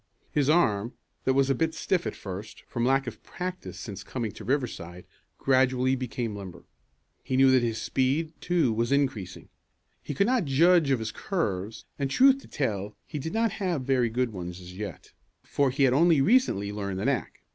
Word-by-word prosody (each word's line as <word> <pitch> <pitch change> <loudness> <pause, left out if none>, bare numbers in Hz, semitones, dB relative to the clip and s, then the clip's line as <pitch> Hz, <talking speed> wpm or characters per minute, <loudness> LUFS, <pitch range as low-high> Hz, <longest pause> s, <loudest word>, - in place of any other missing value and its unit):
His 145 -1 +1
arm, 120 -10 +2 0.3
that 130 - +2
was 135 0 +3
a - - +4
bit 160 +4 -1
stiff 180 0 0
at - - -4
first, 100 +2 -8
from 120 - -3
lack 135 +2 +3
of 120 - -7
practice 180 0 -6
since 100 -2 -7
coming 115 0 -4
to - - -11
Riverside, 95 - -3 0.3
gradually 130 -1 +2
became 120 -3 -3
limber. 95 -4 -9 0.6
He 130 - -1
knew 135 0 +6
that 130 -1 +5
his 115 -2 -1
speed, 145 +5 0
too, 165 -9 +2
was 115 +3 -1
increasing. 130 -10 -1 0.5
He 145 - -6
could 200 - +3
not 245 -4 +2
judge 160 +3 +4
of 135 - +3
his 110 -1 -4
curves, 110 - -3
and, 140 -1 0
truth 270 - +5
to - - -15
tell 105 -6 -3
he 150 - -5
did 160 +4 -4
not 225 -1 +2
have 175 -8 0
very 125 -3 +2
good 120 0 -1
ones 90 -1 -6
as 90 0 -11
yet, 100 -4 -7 0.3
for 140 -1 +1
he 135 +2 0
had 130 -2 +4
only 165 +2 +5
recently 135 - +3
learned 100 -2 -4
the 100 - -3
knack. 135 -2 -2
130 Hz, 190 wpm, -27 LUFS, 105-150 Hz, 0.6 s, knew